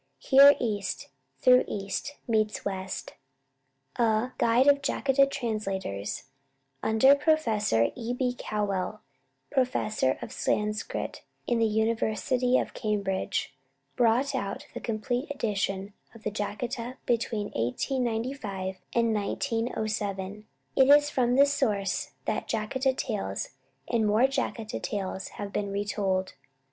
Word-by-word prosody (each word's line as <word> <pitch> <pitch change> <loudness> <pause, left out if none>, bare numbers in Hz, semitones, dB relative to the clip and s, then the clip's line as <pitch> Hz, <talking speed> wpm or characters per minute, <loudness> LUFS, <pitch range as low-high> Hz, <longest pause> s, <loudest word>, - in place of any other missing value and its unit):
Here 280 +1 +7
East, 205 -4 -2 0.3
though 250 0 +7
East, 200 +8 -4
meets 215 -2 0
West! 190 -1 -4 0.8
A 230 +1 +2
"Guild 235 +3 +4
of 280 0 +6
Jataka 275 0 +2
Translators," 195 - -3 0.6
under 220 +5 +5
Professor 225 - +2
E. 235 -1 -4
B. 250 0 -1
Cowell, 210 -2 -2 0.5
professor 245 - +1
of - - -7
Sanskrit 210 +1 -2 0.2
in 240 -1 +1
the 225 - +4
University 225 +3 +1
of - - -2
Cambridge, 200 - -2 0.4
brought 245 +3 +3
out 200 0 -3
the - - -5
complete 245 +4 -2
edition 200 -6 -2 0.2
of 225 - -14
the 215 - -2
Jataka 230 +4 -4
between 225 -3 -1
1895 220 - -2 0.2
and 230 -1 +3
1907. 210 -3 -2 0.3
It 265 0 +5
is 290 +1 +6
from 245 -2 +2
this 280 +1 +5
source 200 -8 -1
that - - -2
"Jataka 260 +5 0
Tales" 95 0 -3 0.4
and 225 -2 +1
"More 215 +4 +3
Jataka 260 -5 -2
Tales" 195 -2 -3
have 200 -1 -5
been 200 -1 -2
retold. 195 -2 -1
220 Hz, 115 wpm, -28 LUFS, 200-250 Hz, 0.8 s, Here